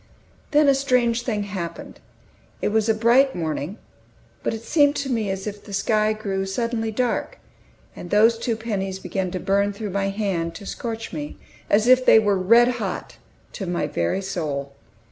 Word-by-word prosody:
Then 300 Hz, 0 st, +4 dB
a 275 Hz, -, +6 dB
strange 250 Hz, -3 st, +1 dB
thing 220 Hz, -4 st, -2 dB
happened. 190 Hz, -4 st, -6 dB, 0.6 s
It -, -, 0 dB
was 220 Hz, +1 st, +1 dB
a -, -, +5 dB
bright 240 Hz, +5 st, +4 dB
morning, 160 Hz, +2 st, -3 dB, 0.6 s
but -, -, -1 dB
it 225 Hz, 0 st, -6 dB
seemed 290 Hz, +1 st, +3 dB
to 275 Hz, -2 st, -2 dB
me 220 Hz, -4 st, 0 dB
as 190 Hz, 0 st, -3 dB
if 205 Hz, -1 st, -6 dB
the 205 Hz, -, -10 dB
sky 215 Hz, +2 st, +2 dB
grew 200 Hz, -3 st, -2 dB
suddenly 225 Hz, +2 st, -2 dB
dark; 245 Hz, +3 st, -1 dB, 0.6 s
and 175 Hz, -, -9 dB
those 225 Hz, +3 st, +4 dB
two 230 Hz, -1 st, -1 dB
pennies 200 Hz, -4 st, -3 dB
began 185 Hz, 0 st, -3 dB
to 185 Hz, +1 st, -4 dB
burn 200 Hz, +2 st, +1 dB
through 205 Hz, 0 st, -5 dB
my 195 Hz, 0 st, 0 dB
hand, 195 Hz, -5 st, -2 dB
to 205 Hz, -, -9 dB
scorch 225 Hz, 0 st, -5 dB
me, 150 Hz, -2 st, -6 dB, 0.3 s
as 215 Hz, +3 st, +3 dB
if 255 Hz, 0 st, +6 dB
they -, -, +7 dB
were 205 Hz, -2 st, +3 dB
red 230 Hz, +6 st, +5 dB
hot, -, -, -5 dB, 0.4 s
to 195 Hz, -, -5 dB
my 175 Hz, -3 st, -1 dB
very 115 Hz, -, -1 dB
soul. 145 Hz, -7 st, -3 dB
210 Hz, 180 wpm, -23 LUFS, 190-230 Hz, 0.6 s, they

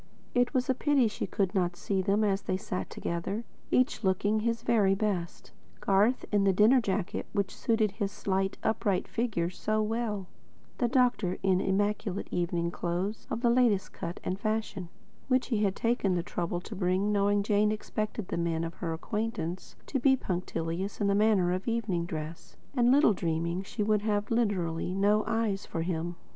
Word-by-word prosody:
It 245 Hz, 0 st, +2 dB
was 255 Hz, -1 st, 0 dB
a 260 Hz, -, +3 dB
pity 275 Hz, -2 st, +3 dB
she 210 Hz, -, -4 dB
could 195 Hz, -1 st, 0 dB
not 180 Hz, -3 st, +1 dB
see 195 Hz, +1 st, -1 dB
them 200 Hz, +3 st, +2 dB
as 200 Hz, -1 st, +1 dB
they 185 Hz, -, -1 dB
sat 185 Hz, -1 st, -4 dB
together, 190 Hz, +6 st, -3 dB, 0.3 s
each 250 Hz, -2 st, +2 dB
looking 205 Hz, +3 st, +2 dB
his 230 Hz, +1 st, -1 dB
very 205 Hz, -5 st, +3 dB
best, 195 Hz, -4 st, -3 dB, 0.3 s
Garth 205 Hz, +6 st, +2 dB
in 205 Hz, -1 st, +3 dB
the 195 Hz, -, +4 dB
dinner 220 Hz, +7 st, +5 dB
jacket 195 Hz, -3 st, -2 dB
which 200 Hz, -2 st, -1 dB
suited 220 Hz, -3 st, +1 dB
his 200 Hz, 0 st, -3 dB
slight 195 Hz, -1 st, -1 dB
upright 210 Hz, -3 st, 0 dB
figure 205 Hz, -8 st, -1 dB
so 215 Hz, +3 st, -1 dB
well; 215 Hz, -2 st, -1 dB, 0.5 s
the 245 Hz, -, +3 dB
doctor 240 Hz, -7 st, +2 dB
in 190 Hz, -1 st, +3 dB
immaculate 200 Hz, 0 st, 0 dB
evening 170 Hz, -1 st, -1 dB
clothes 180 Hz, +5 st, -3 dB
of 230 Hz, -, -3 dB
the 240 Hz, -2 st, +4 dB
latest 235 Hz, -5 st, +2 dB
cut 170 Hz, +1 st, -5 dB
and 185 Hz, +1 st, -2 dB
fashion, 215 Hz, -4 st, -2 dB, 0.4 s
which 255 Hz, -1 st, +1 dB
he 225 Hz, -4 st, +1 dB
had 195 Hz, -1 st, +1 dB
taken 230 Hz, -5 st, +1 dB
the 175 Hz, -, 0 dB
trouble 175 Hz, 0 st, -2 dB
to -, -, -8 dB
bring, 185 Hz, +2 st, +1 dB
knowing 205 Hz, 0 st, +2 dB
Jane 210 Hz, 0 st, +3 dB
expected 215 Hz, -1 st, -3 dB
the -, -, -2 dB
men 165 Hz, -1 st, 0 dB
of 165 Hz, 0 st, -4 dB
her 165 Hz, -1 st, -3 dB
acquaintance 190 Hz, -1 st, -4 dB
to 270 Hz, -, -1 dB
be 265 Hz, +1 st, +5 dB
punctilious 180 Hz, -2 st, -3 dB
in 205 Hz, -, +1 dB
the 200 Hz, -, +3 dB
matter 205 Hz, -4 st, +3 dB
of 185 Hz, +4 st, -2 dB
evening 210 Hz, -7 st, -1 dB
dress, 160 Hz, 0 st, -7 dB, 0.2 s
and 245 Hz, -2 st, +4 dB
little 275 Hz, -5 st, +5 dB
dreaming 170 Hz, 0 st, -1 dB
she 210 Hz, +2 st, -3 dB
would 210 Hz, 0 st, +2 dB
have, 210 Hz, 0 st, -1 dB
literally, 185 Hz, -7 st, 0 dB
no 205 Hz, +2 st, +3 dB
eyes 225 Hz, -3 st, -1 dB
for 165 Hz, -, -3 dB
him. 170 Hz, 0 st, -2 dB
200 Hz, 180 wpm, -29 LUFS, 180-220 Hz, 0.5 s, dinner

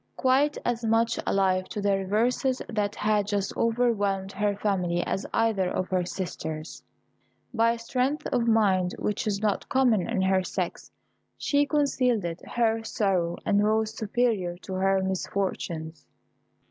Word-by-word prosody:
Quite 275 Hz, +3 st, +2 dB
as 240 Hz, -1 st, -1 dB
much 225 Hz, +1 st, +2 dB
alive 185 Hz, -1 st, +1 dB
to -, -, -4 dB
the 200 Hz, -1 st, +2 dB
reverses 235 Hz, +7 st, 0 dB
that 210 Hz, -2 st, -1 dB
had 210 Hz, -1 st, +1 dB
just 200 Hz, -1 st, -1 dB
overwhelmed 205 Hz, -5 st, +1 dB
her 205 Hz, 0 st, 0 dB
family 180 Hz, -4 st, 0 dB
as 195 Hz, -, -2 dB
either 220 Hz, -5 st, +1 dB
of 185 Hz, -, -2 dB
her 185 Hz, -1 st, +1 dB
sisters, 160 Hz, -4 st, -5 dB, 0.7 s
by 230 Hz, 0 st, +3 dB
a -, -, -5 dB
strength 255 Hz, +5 st, -1 dB
of 240 Hz, -2 st, +1 dB
mind 195 Hz, -5 st, +3 dB
which 210 Hz, +1 st, -2 dB
is 205 Hz, 0 st, -1 dB
not 210 Hz, -2 st, 0 dB
common 240 Hz, -7 st, +2 dB
in 210 Hz, -5 st, 0 dB
her 190 Hz, 0 st, +2 dB
sex, -, -, -4 dB, 0.5 s
she 285 Hz, 0 st, +1 dB
concealed 255 Hz, -, +1 dB, 0.3 s
her 225 Hz, -1 st, +2 dB
sorrow, 185 Hz, -6 st, 0 dB
and 205 Hz, 0 st, +3 dB
rose 220 Hz, +1 st, +1 dB
superior 215 Hz, -5 st, 0 dB
to 190 Hz, -, -6 dB
her 190 Hz, 0 st, +2 dB
misfortunes. 175 Hz, -5 st, -3 dB
205 Hz, 145 wpm, -27 LUFS, 190-230 Hz, 0.7 s, by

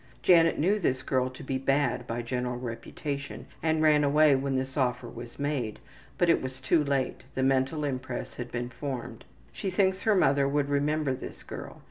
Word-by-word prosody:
Janet 165 Hz, -2 st, +5 dB
knew 195 Hz, +7 st, +2 dB
this 130 Hz, -8 st, 0 dB
girl 130 Hz, -1 st, +1 dB
to 130 Hz, -, -11 dB
be 130 Hz, 0 st, -2 dB
bad 135 Hz, -2 st, +1 dB
by 120 Hz, +1 st, -3 dB
general 125 Hz, 0 st, -2 dB
reputation, 140 Hz, +4 st, -5 dB, 0.2 s
and 160 Hz, -1 st, +1 dB
ran 150 Hz, -1 st, +5 dB
away 145 Hz, 0 st, +5 dB
when 135 Hz, 0 st, -1 dB
this 130 Hz, 0 st, -2 dB
offer 125 Hz, -3 st, 0 dB
was 120 Hz, +1 st, -9 dB
made, 140 Hz, -6 st, -2 dB, 0.4 s
but 175 Hz, -, +3 dB
it 165 Hz, -, +4 dB
was 130 Hz, 0 st, -5 dB
too 150 Hz, +4 st, +2 dB
late 140 Hz, -2 st, -1 dB
the 130 Hz, -, 0 dB
mental 135 Hz, +3 st, +1 dB
impress 130 Hz, -3 st, -3 dB
had 120 Hz, -1 st, -6 dB
been 120 Hz, +1 st, -3 dB
formed. 125 Hz, -3 st, -6 dB, 0.3 s
She 195 Hz, -, -3 dB
thinks 190 Hz, 0 st, +1 dB
her 220 Hz, -2 st, +3 dB
mother 140 Hz, -5 st, +3 dB
would 145 Hz, 0 st, 0 dB
remember 145 Hz, 0 st, +1 dB
this 130 Hz, -, -8 dB
girl. -, -, -8 dB
135 Hz, 185 wpm, -28 LUFS, 125-150 Hz, 0.4 s, Janet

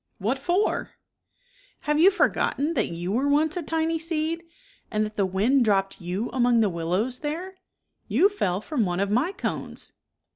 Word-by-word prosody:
"What 230 Hz, +8 st, -1 dB
for?" 355 Hz, +9 st, 0 dB, 0.4 s
" -, -, -34 dB
Have 300 Hz, 0 st, 0 dB
you 360 Hz, +4 st, +8 dB
forgotten 330 Hz, -5 st, +1 dB
that 225 Hz, -9 st, +1 dB
you 175 Hz, +2 st, -4 dB
were 255 Hz, +7 st, +1 dB
once 300 Hz, +3 st, +2 dB
a 355 Hz, -, -2 dB
tiny 325 Hz, +1 st, -1 dB
seed? 325 Hz, 0 st, -2 dB, 0.5 s
and 215 Hz, -1 st, 0 dB
that 215 Hz, -, -6 dB
the 205 Hz, -2 st, +1 dB
r -, -, -9 dB
wind 230 Hz, +8 st, +3 dB
dropped 195 Hz, -3 st, +1 dB
you 185 Hz, +7 st, -3 dB
among 245 Hz, -2 st, +3 dB
the 215 Hz, -2 st, +3 dB
wil 165 Hz, -1 st, -4 dB
lows 220 Hz, +9 st, 0 dB
there? 350 Hz, +6 st, -4 dB, 0.5 s
You 390 Hz, -, +4 dB
fell 200 Hz, -, -1 dB
from 255 Hz, 0 st, -1 dB
one 180 Hz, -2 st, -1 dB
of 200 Hz, +1 st, 0 dB
my 255 Hz, -, +2 dB
cones." 400 Hz, -, -5 dB
265 Hz, 185 wpm, -25 LUFS, 200-330 Hz, 0.5 s, you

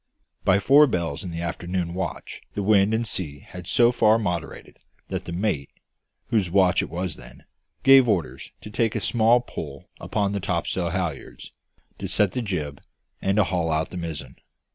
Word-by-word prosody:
By 95 Hz, -1 st, +4 dB
four 140 Hz, +9 st, +6 dB
bells 85 Hz, -, -2 dB
in 90 Hz, -, -5 dB
the 85 Hz, 0 st, -5 dB
afternoon 85 Hz, +1 st, -3 dB
watch 85 Hz, -5 st, -5 dB
the 100 Hz, -, -2 dB
wind 100 Hz, 0 st, +4 dB
and 115 Hz, +1 st, 0 dB
sea 85 Hz, -9 st, -4 dB
had 90 Hz, -1 st, -10 dB
so 120 Hz, +5 st, +4 dB
far 110 Hz, -2 st, +4 dB
moderated 90 Hz, -7 st, -4 dB, 0.3 s
that -, -, -4 dB
the -, -, -6 dB
mate, 85 Hz, -6 st, -1 dB, 0.6 s
whose 105 Hz, -6 st, +1 dB
watch 95 Hz, 0 st, +4 dB
it -, -, -4 dB
then -, -, -18 dB
was, 90 Hz, -3 st, -3 dB, 0.6 s
gave 135 Hz, -2 st, +7 dB
orders 80 Hz, -, -1 dB
to 105 Hz, -, -9 dB
take 115 Hz, +1 st, 0 dB
a -, -, +1 dB
small 120 Hz, +1 st, +3 dB
pull 120 Hz, -, -8 dB
upon 100 Hz, -2 st, -1 dB
the 100 Hz, -, -2 dB
topsail 90 Hz, -2 st, -1 dB
halliards, 85 Hz, -5 st, -4 dB, 0.5 s
to -, -, -4 dB
set 105 Hz, -3 st, +2 dB
the 125 Hz, -, -2 dB
jib, 75 Hz, -, -4 dB, 0.4 s
and 95 Hz, 0 st, +1 dB
to 105 Hz, -, +6 dB
haul 90 Hz, -2 st, -1 dB
out 80 Hz, 0 st, -1 dB
the 90 Hz, -, -6 dB
mizzen. 75 Hz, -6 st, -6 dB
95 Hz, 180 wpm, -24 LUFS, 85-105 Hz, 0.6 s, gave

